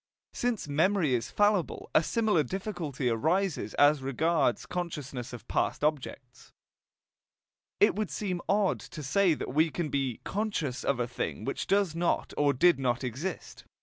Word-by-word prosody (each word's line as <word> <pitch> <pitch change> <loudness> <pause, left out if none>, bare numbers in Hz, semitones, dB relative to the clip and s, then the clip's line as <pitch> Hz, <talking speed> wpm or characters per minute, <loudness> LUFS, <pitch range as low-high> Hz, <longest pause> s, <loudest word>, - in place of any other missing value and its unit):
Since 240 -8 -1
memory 160 +1 +2
is 115 -2 -1
fallible, 205 -4 +1
a - - +6
similar 210 -1 +2
difficulty 160 - -3
arises 160 - 0
as 145 0 +5
regards 140 0 +1
consciousness 145 -8 -5
of 120 - -10
past - - -1
objects. 130 -4 -3 1.3
It - - +5
would 215 -3 -2
seem 185 -4 -3
odd 200 -1 +2
to 155 - -9
say 170 +5 +3
that - - -5
we 160 +3 +3
can 160 0 -3
be 135 -5 -1
"conscious" 190 - -2
of 140 - 0
a 120 - 0
thing 125 - -4
which 135 - -3
does 195 -4 +2
not 170 +1 -1
or 145 -1 +3
did 170 +4 +4
not 125 -1 0
exist. 140 +9 -5
155 Hz, 150 wpm, -29 LUFS, 135-190 Hz, 1.3 s, a